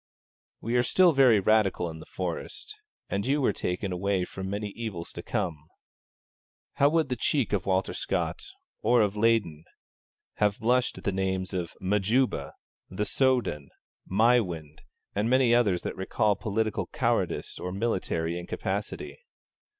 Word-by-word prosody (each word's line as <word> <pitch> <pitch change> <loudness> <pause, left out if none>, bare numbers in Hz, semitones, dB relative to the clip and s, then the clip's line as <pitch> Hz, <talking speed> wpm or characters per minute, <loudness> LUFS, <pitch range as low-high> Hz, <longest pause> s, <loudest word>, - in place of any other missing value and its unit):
We 115 +2 -2
are - - +5
still 180 +7 +4
very 130 -6 +6
Radical 100 -3 +2
in 80 -1 -7
the - - -12
Forest, 95 - -5 0.3
and 100 0 -2
you 140 +5 +1
were 135 - +2
taken 90 +2 -3
away 95 0 0
from 95 +1 -6
many 105 +1 -3
evils 100 -6 -6
to 85 - -6
come. 85 -8 -3 1.1
How 140 0 +5
would 160 -2 +1
the 125 - 0
cheek 125 0 0
of 100 -3 -1
Walter 95 0 +1
Scott, - - -2 0.4
or 120 +2 +4
of 105 0 -1
Leyden, 105 -8 +1 0.7
have 105 -1 +2
blushed 125 +2 +1
at - - -10
the 100 - 0
names 95 0 -2
of 90 -3 -3
Majuba, 100 - +1 0.4
The 105 +3 -2
Soudan, 120 - +1 0.4
Maiwand, 95 -8 +2 0.3
and 105 +3 0
many 130 -2 +4
others 105 -7 +3
that - - -4
recall 105 +2 +1
political 110 +2 -1
cowardice - - -1
or 90 - -4
military 90 -5 -1
incapacity! 95 +4 -4
100 Hz, 145 wpm, -28 LUFS, 90-120 Hz, 1.1 s, very